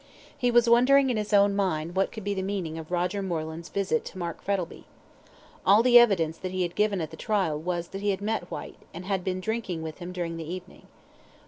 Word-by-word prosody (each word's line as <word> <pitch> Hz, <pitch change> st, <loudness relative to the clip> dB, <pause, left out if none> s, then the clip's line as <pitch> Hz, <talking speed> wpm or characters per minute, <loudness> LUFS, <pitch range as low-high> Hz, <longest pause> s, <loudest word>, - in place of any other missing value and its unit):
He 245 Hz, -, +1 dB
was 240 Hz, 0 st, +4 dB
wondering 260 Hz, +3 st, +5 dB
in 235 Hz, -, -1 dB
his 210 Hz, 0 st, -3 dB
own 200 Hz, -1 st, +5 dB
mind 175 Hz, -4 st, -1 dB
what 195 Hz, +1 st, +1 dB
could 220 Hz, -, -8 dB
be 205 Hz, +1 st, -1 dB
the 190 Hz, -, -2 dB
meaning 185 Hz, -5 st, -3 dB
of 155 Hz, -, -9 dB
Roger 180 Hz, +3 st, -1 dB
Moreland's 165 Hz, -2 st, -4 dB
visit 190 Hz, -5 st, 0 dB
to -, -, -9 dB
Mark 170 Hz, -2 st, -5 dB
Frettlby. 190 Hz, -3 st, -3 dB, 0.8 s
All 210 Hz, +3 st, +6 dB
the 245 Hz, -1 st, +8 dB
evidence 170 Hz, -9 st, +3 dB
that 185 Hz, -, -4 dB
he 185 Hz, 0 st, 0 dB
had 175 Hz, -1 st, -3 dB
given 210 Hz, -3 st, +1 dB
at 160 Hz, -1 st, -4 dB
the 160 Hz, -, -10 dB
trial 195 Hz, -8 st, 0 dB
was 170 Hz, +1 st, -3 dB
that 195 Hz, -, -6 dB
he 205 Hz, -, 0 dB
had 195 Hz, -, 0 dB
met 205 Hz, -3 st, -2 dB
Whyte, -, -, -8 dB
and 175 Hz, +2 st, -7 dB
had 190 Hz, -2 st, -1 dB
been 185 Hz, 0 st, -2 dB
drinking 190 Hz, -5 st, -3 dB
with 160 Hz, +1 st, -7 dB
him 175 Hz, 0 st, -6 dB
during 170 Hz, -2 st, -4 dB
the 165 Hz, 0 st, -6 dB
evening. 185 Hz, 0 st, -9 dB
185 Hz, 230 wpm, -27 LUFS, 170-205 Hz, 0.8 s, the